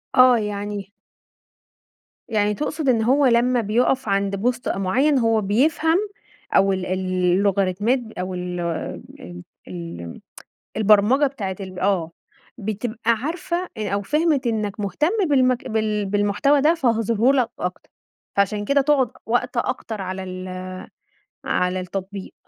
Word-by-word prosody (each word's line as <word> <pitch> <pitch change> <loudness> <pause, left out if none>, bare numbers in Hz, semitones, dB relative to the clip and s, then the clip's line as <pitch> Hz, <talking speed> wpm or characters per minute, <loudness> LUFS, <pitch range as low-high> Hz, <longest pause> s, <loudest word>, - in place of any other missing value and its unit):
آه، 255 -1 +7
يعني 205 -1 -4 1.4
يعني 210 -1 +1
تقصد 300 +3 -2
إن 225 -3 +3
هو 275 +4 +3
لمّا 245 0 +3
بيُقف 240 +4 +1
عند 200 0 +1
post 245 0 0
أ - - -1
معيّن 260 +9 +2
هو 225 -1 +2
بيفهم 300 - +2 0.6
أو 195 0 +4
ال 185 -1 -3
ال 185 - -1 0.4
اللوغاريتمات 200 +4 +1 0.2
أو 185 +1 -3
ال 180 0 -4 0.6
ال 90 0 -10 0.2
ال 85 -1 -8 0.6
البرمجة 215 +7 +4
بتاعة 200 -9 -5
ال 185 -2 -7
آه، 180 -3 0 0.5
بتبقى 220 +2 -2
عارفة 340 +8 -2
أ 215 -2 -3
أو 200 - 0
فهمت 295 +2 +1
إنك 215 -2 -2
مهتم 210 - 0 0.2
بالمك 255 -3 +2
بال 215 -2 0
بالمحتوى 205 +8 +2
ده، 310 +4 +5
فهاظهرهُ 230 -4 +2
لك 255 -4 +2
أكتر، 180 0 -5 0.5
فعشان 205 +1 +1
كده 280 +4 +3
تقعد 270 -4 +2
وقت 240 +1 -1
أكتر 220 -2 -2
على 190 0 -4
ال 185 0 -6 0.8
على 180 +1 0
التطبيق. 190 +2 -6
215 Hz, 130 wpm, -22 LUFS, 195-255 Hz, 1.4 s, آه